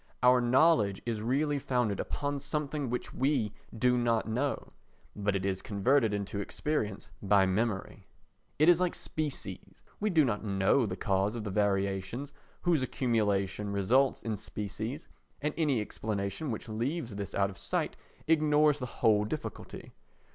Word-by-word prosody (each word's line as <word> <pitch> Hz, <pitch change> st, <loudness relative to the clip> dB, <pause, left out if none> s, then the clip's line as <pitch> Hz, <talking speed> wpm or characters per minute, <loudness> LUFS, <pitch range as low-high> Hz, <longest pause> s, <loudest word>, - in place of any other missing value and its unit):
Our 125 Hz, 0 st, +6 dB
knowledge 120 Hz, -, +4 dB
is 115 Hz, -3 st, -2 dB
really 140 Hz, +5 st, +1 dB
founded 125 Hz, -7 st, 0 dB
upon 145 Hz, 0 st, -2 dB
something 150 Hz, -2 st, -2 dB
which 125 Hz, -, -3 dB
we 130 Hz, -5 st, +1 dB, 0.2 s
do 125 Hz, +2 st, +3 dB
not 115 Hz, -2 st, +1 dB
know, 130 Hz, +6 st, -2 dB, 0.4 s
but 105 Hz, -1 st, 0 dB
it 95 Hz, 0 st, -1 dB
is 95 Hz, -1 st, -1 dB
converted 110 Hz, +3 st, +2 dB
into 100 Hz, 0 st, -3 dB
experience 105 Hz, -3 st, -3 dB
by 100 Hz, -1 st, +4 dB
memory. 95 Hz, +1 st, -2 dB, 0.5 s
It 155 Hz, -, +4 dB
is 175 Hz, -1 st, +7 dB
like 180 Hz, -1 st, +1 dB
species—we 150 Hz, -, -5 dB
do 160 Hz, -6 st, +4 dB
not 105 Hz, -5 st, -1 dB
know 100 Hz, +4 st, +2 dB
the -, -, -3 dB
cause 100 Hz, +1 st, +1 dB
of 115 Hz, -, -4 dB
the 105 Hz, -, -4 dB
variations 100 Hz, +6 st, -1 dB, 0.3 s
whose 170 Hz, -5 st, +3 dB
accumulation 105 Hz, -6 st, 0 dB
results 120 Hz, +8 st, +2 dB
in 110 Hz, -2 st, -2 dB
species 110 Hz, -, -5 dB, 0.3 s
and 150 Hz, +1 st, -1 dB
any 150 Hz, -7 st, +2 dB
explanation 105 Hz, +5 st, -3 dB
which 115 Hz, +1 st, -4 dB
leaves 120 Hz, +3 st, -2 dB
this 100 Hz, -1 st, -5 dB
out 100 Hz, 0 st, +2 dB
of 95 Hz, -, -12 dB
sight -, -, -1 dB, 0.3 s
ignores 150 Hz, -2 st, +4 dB
the 125 Hz, -, -3 dB, 0.2 s
whole 105 Hz, -2 st, +5 dB
difficulty. 145 Hz, +8 st, -6 dB
115 Hz, 145 wpm, -30 LUFS, 100-140 Hz, 0.5 s, is